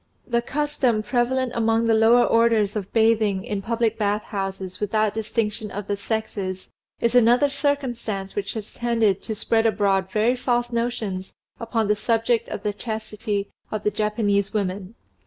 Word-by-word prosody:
The 235 Hz, -1 st, +1 dB
custom 260 Hz, -4 st, 0 dB
prevalent 250 Hz, +2 st, 0 dB
among 225 Hz, 0 st, +2 dB
the 230 Hz, -, +3 dB
lower 225 Hz, +2 st, +5 dB
orders 230 Hz, -3 st, +3 dB
of 200 Hz, -3 st, -4 dB
bathing 220 Hz, -4 st, +2 dB
in 205 Hz, -4 st, -3 dB
public 225 Hz, +1 st, 0 dB
bath 210 Hz, 0 st, 0 dB
houses 195 Hz, -2 st, -5 dB
without 215 Hz, 0 st, +1 dB
distinction 220 Hz, -1 st, -2 dB
of 205 Hz, +1 st, -5 dB
the 205 Hz, -, -1 dB
sexes, 200 Hz, -3 st, -4 dB, 0.3 s
is 235 Hz, 0 st, +1 dB
another 245 Hz, +4 st, +5 dB
circumstance 245 Hz, -9 st, -2 dB
which 200 Hz, +1 st, -3 dB
has 215 Hz, -2 st, -6 dB
tended 230 Hz, -5 st, +1 dB
to 220 Hz, -, -4 dB
spread 225 Hz, +1 st, +2 dB
abroad 195 Hz, -3 st, +1 dB
very 220 Hz, +5 st, +2 dB
false 240 Hz, -1 st, 0 dB
notions 230 Hz, -6 st, -3 dB, 0.2 s
upon 225 Hz, -2 st, -1 dB
the 210 Hz, -, +3 dB
subject 230 Hz, +2 st, +1 dB
of -, -, -5 dB
the 210 Hz, -, -1 dB
chastity 215 Hz, -2 st, -4 dB, 0.2 s
of 215 Hz, -1 st, -4 dB
the 210 Hz, -, +1 dB
Japanese 210 Hz, -1 st, 0 dB
women. 195 Hz, 0 st, -3 dB
220 Hz, 155 wpm, -23 LUFS, 205-235 Hz, 0.3 s, lower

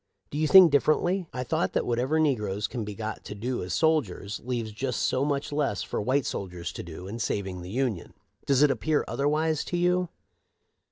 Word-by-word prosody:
Do 145 Hz, -, -3 dB
you 155 Hz, -, +2 dB
think 180 Hz, +1 st, +9 dB
dif 145 Hz, -1 st, +4 dB
ferently? 175 Hz, +4 st, +2 dB
I 125 Hz, -, -3 dB
thought 95 Hz, -6 st, -1 dB
that -, -, 0 dB
whatever 125 Hz, +6 st, +1 dB
negroes 105 Hz, -9 st, 0 dB
can 120 Hz, -3 st, -4 dB
be 105 Hz, -1 st, -6 dB
got 110 Hz, 0 st, -5 dB
to 105 Hz, -, -6 dB
do 120 Hz, +4 st, -3 dB
as 90 Hz, -, -3 dB
soldiers 125 Hz, -, 0 dB
leaves 120 Hz, -3 st, -3 dB
just 125 Hz, +3 st, -2 dB
so 130 Hz, -, +1 dB
much 140 Hz, 0 st, -1 dB
less 145 Hz, -9 st, 0 dB
for -, -, -3 dB
white 130 Hz, +4 st, +1 dB
soldiers 90 Hz, -3 st, -4 dB
to -, -, -6 dB
do, 85 Hz, +2 st, -9 dB
in 110 Hz, +4 st, -6 dB
saving 95 Hz, -5 st, -2 dB
the 90 Hz, -, -8 dB
Union. 120 Hz, -5 st, -2 dB, 0.3 s
Does 140 Hz, 0 st, +4 dB
it 150 Hz, -, +5 dB
appear 155 Hz, +2 st, 0 dB
otherwise 155 Hz, +2 st, 0 dB
to 175 Hz, -, -2 dB
you 180 Hz, 0 st, +2 dB
130 Hz, 205 wpm, -27 LUFS, 105-150 Hz, 0.3 s, think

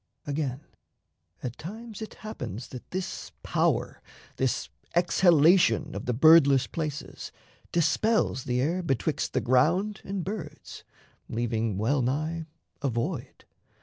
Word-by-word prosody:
Again, 140 Hz, -2 st, -2 dB, 0.8 s
at 125 Hz, -1 st, -5 dB
times 220 Hz, +5 st, -8 dB
it 220 Hz, -, -7 dB
happens 130 Hz, -, -6 dB
that 125 Hz, -, -10 dB
this 185 Hz, 0 st, -4 dB
power, -, -, 0 dB, 0.4 s
This -, -, 0 dB, 0.3 s
exhalation 170 Hz, -2 st, +4 dB
of -, -, -6 dB
the 125 Hz, -, +1 dB
Birdless 140 Hz, -2 st, +7 dB
places, 155 Hz, -3 st, -5 dB, 0.4 s
Dispels 170 Hz, -, +2 dB
the 125 Hz, -2 st, 0 dB
air 170 Hz, +7 st, 0 dB
betwixt 135 Hz, -, -1 dB
the -, -, +1 dB
ground 175 Hz, -, +2 dB
and 195 Hz, -2 st, -3 dB
birds, 200 Hz, -2 st, -7 dB, 0.5 s
Leaving 115 Hz, -3 st, -1 dB
well 130 Hz, +7 st, +1 dB
nigh 155 Hz, +6 st, -1 dB, 0.3 s
a 140 Hz, -, +1 dB
void. 120 Hz, +4 st, -4 dB
155 Hz, 115 wpm, -28 LUFS, 130-180 Hz, 0.8 s, Birdless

